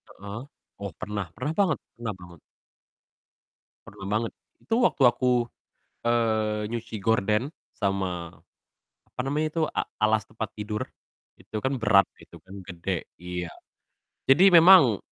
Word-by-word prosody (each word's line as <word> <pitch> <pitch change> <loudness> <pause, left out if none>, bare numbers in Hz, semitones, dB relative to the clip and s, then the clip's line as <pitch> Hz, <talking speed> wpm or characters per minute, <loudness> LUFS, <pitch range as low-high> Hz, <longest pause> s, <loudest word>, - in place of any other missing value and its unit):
Heeh, 100 +4 -7 0.4
oh 100 -1 -4
pernah. 105 -2 -3
Pernah 145 +5 -3
banget 195 -2 +3 0.2
pernah 115 -3 -4
banget. 85 -2 -13 1.5
Pernah 95 - -11
banget. 110 +2 0 0.3
Itu 225 - -2
waktu 145 - +3
aku, 125 +1 +2 0.7
eee, 110 -2 +1
nyuci 115 -1 -5
gorden 110 +3 +1 0.2
sama, 95 -4 -2 0.7
apa - - -17
namanya 150 +4 0
itu, 165 - -1
a - - 0 0.2
alas 110 -1 +2
tempat 110 -2 -5
tidur, 105 0 -4 0.6
itu - - -12
kan 130 -1 0
berat 105 -3 +5 0.2
gitu 85 -2 -15
kan, 95 +1 -10
gede. 90 0 -4
Iya. 90 0 -5 0.8
Jadi 175 +9 +7
memang 165 - +8
110 Hz, 125 wpm, -26 LUFS, 100-125 Hz, 1.5 s, memang